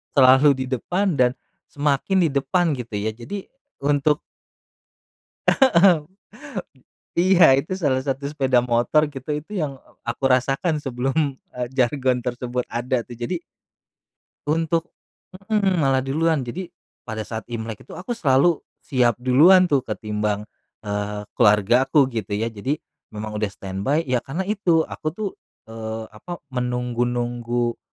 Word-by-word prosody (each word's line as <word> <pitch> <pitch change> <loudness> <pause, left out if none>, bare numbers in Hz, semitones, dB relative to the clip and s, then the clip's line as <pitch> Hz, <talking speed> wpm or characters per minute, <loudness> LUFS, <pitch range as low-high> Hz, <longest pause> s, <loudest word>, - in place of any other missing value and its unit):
selalu 135 +1 +7
di - - -5
depan 180 - 0
dan 125 0 +4 0.3
semakin 145 +6 +1
di 165 - +3
depan, 165 +5 +1
gitu 120 -2 -8
ya, 105 +2 -1
jadi 125 - -8 0.3
untuk 145 +1 +2 1.3
Heeh, 195 - +5 1.2
iya, 185 0 +6
itu 155 - -7
salah 140 -7 +1
satu 135 0 -3
sepeda 135 -3 +1
motor, 120 +5 +2
gitu, 135 +1 -9
itu 155 +7 -10
yang 140 -3 -3 0.2
aku 120 +3 -5
rasakan 135 +5 +2
sebelum, 135 +2 -1 0.2
eee, 125 -1 -3
jargon 130 0 +2
tersebut 125 0 -2
ada 120 0 -1
tuh, - - -10
jadi 120 +10 -2 1.1
Untuk, 165 +2 0 0.6
mhm, 200 -4 +2
malah 135 -3 +2
duluan, 155 +2 +1
jadi 165 +10 -5 0.4
pada 110 -2 -4
saat 110 +1 -6
Imlek 110 -2 -6
itu - - -10
aku 185 +6 -8
selalu 165 - +3 0.2
siap 125 -3 +2
duluan 175 +9 +6
tuh, 135 -3 +2
ketimbang, 105 -1 -2 0.4
eee, 105 0 -3 0.2
keluarga 105 +5 +4
aku, 140 -4 +3
gitu 110 -4 -3
ya. 110 +3 -1
Jadi 125 +8 -2 0.4
memang 105 0 -5
udah 105 - +1
stand 95 0 -6
by 150 +4 +2
ya 130 -5 0
karena 140 +9 -4
itu, 190 -6 +2
aku - - -9
tuh, 210 0 -3 0.4
eee, 110 0 -5
apa, 175 +11 -9
menunggu-nunggu 120 -1 -1
130 Hz, 135 wpm, -23 LUFS, 120-155 Hz, 1.3 s, selalu